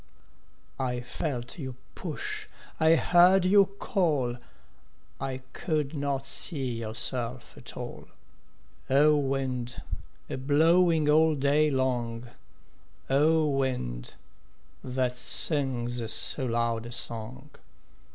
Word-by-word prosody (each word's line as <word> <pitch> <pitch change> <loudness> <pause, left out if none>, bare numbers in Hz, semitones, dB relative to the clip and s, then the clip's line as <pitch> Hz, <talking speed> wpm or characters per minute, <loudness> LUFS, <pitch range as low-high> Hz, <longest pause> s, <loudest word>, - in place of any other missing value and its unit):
I 125 -2 -2
felt 125 +2 -5
you 130 -4 -6 0.2
push, - - -4 0.3
I 160 +1 +5
heard 180 +3 +5
you 200 +1 +6
call, 150 - 0 0.8
I 130 -1 -5
could 155 -3 -2
not 140 -2 -2
see 135 -2 +1
yourself 115 +2 -2
at - - -6
all - - -8 0.8
O 150 +3 +5
wind, 135 -3 -2 0.5
a - - -5
blowing 160 +4 +3
all 155 +1 +4
day 145 +2 +2
long, 120 -3 -2 0.8
O 155 +3 +3
wind, 125 - -2 0.7
that 125 -1 -1
sings 125 -4 +2
so 130 -3 +2
loud 115 -1 -1
a - - -9
song! 120 +4 -1
135 Hz, 100 wpm, -28 LUFS, 120-150 Hz, 0.8 s, you